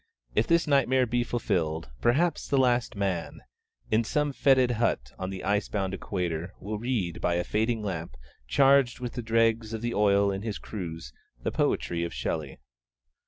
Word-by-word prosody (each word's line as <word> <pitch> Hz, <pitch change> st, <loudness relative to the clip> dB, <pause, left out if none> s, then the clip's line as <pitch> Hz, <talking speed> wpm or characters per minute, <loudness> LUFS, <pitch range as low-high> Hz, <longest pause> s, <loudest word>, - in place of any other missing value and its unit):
If 110 Hz, -, +2 dB
this 170 Hz, 0 st, +3 dB
nightmare 130 Hz, -3 st, +3 dB
be 120 Hz, +1 st, 0 dB
fulfilled, 80 Hz, -, -1 dB
perhaps 150 Hz, +7 st, +2 dB
the 140 Hz, -, +1 dB
Last 125 Hz, -3 st, +2 dB
Man, 95 Hz, -4 st, -2 dB, 0.5 s
in 110 Hz, +2 st, +3 dB
some 145 Hz, +5 st, 0 dB
fetid 130 Hz, -2 st, +4 dB
hut 60 Hz, -, 0 dB
on 95 Hz, -, -3 dB
the 95 Hz, -1 st, -6 dB
ice 100 Hz, +1 st, 0 dB
bound 95 Hz, -2 st, -2 dB
Equator, 90 Hz, -2 st, -3 dB
will 105 Hz, +1 st, -4 dB
read. 110 Hz, -8 st, -2 dB
by 85 Hz, -, +1 dB
a 90 Hz, -, 0 dB
fading 110 Hz, +3 st, 0 dB
lamp 85 Hz, -8 st, -4 dB, 0.3 s
charged 135 Hz, -, +4 dB
with 125 Hz, -1 st, -5 dB
the 125 Hz, -, -4 dB
dregs 115 Hz, 0 st, +1 dB
of 110 Hz, 0 st, -4 dB
the 120 Hz, 0 st, -1 dB
oil 100 Hz, -1 st, +3 dB
in 95 Hz, 0 st, -3 dB
his 110 Hz, -1 st, -3 dB
cruse, 80 Hz, -, -7 dB, 0.3 s
the -, -, -1 dB
poetry 85 Hz, -1 st, 0 dB
of 85 Hz, -, -4 dB
Shelley. 75 Hz, -4 st, -3 dB
110 Hz, 170 wpm, -28 LUFS, 90-120 Hz, 0.5 s, fetid